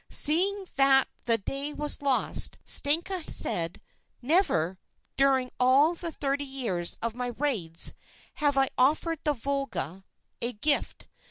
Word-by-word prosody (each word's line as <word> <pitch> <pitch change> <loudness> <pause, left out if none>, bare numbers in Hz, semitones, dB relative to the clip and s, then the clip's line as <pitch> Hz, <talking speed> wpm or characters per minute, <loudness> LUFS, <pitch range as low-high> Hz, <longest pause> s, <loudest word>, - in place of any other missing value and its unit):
Seeing 385 +6 +2
that 270 -1 +4 0.2
the 230 -1 +2
day 275 +7 -5
was 295 -1 +2
lost, 275 -2 +1
Stenka 335 +4 0
said: 165 0 +2 0.4
'Never, 215 - +1 0.4
during 265 -2 +2
all 270 +6 +4
the 335 -1 -4
thirty 285 -1 -2
years 235 -11 0
of 230 -1 -1
my 245 +1 -4
raids, 205 - 0 0.4
have 290 -2 +1
I 270 -1 +4
offered 310 +5 +2
the 300 - +2
Volga 270 - -4 0.4
a 240 +1 -1
gift. 285 +8 -2
275 Hz, 125 wpm, -27 LUFS, 240-295 Hz, 0.4 s, that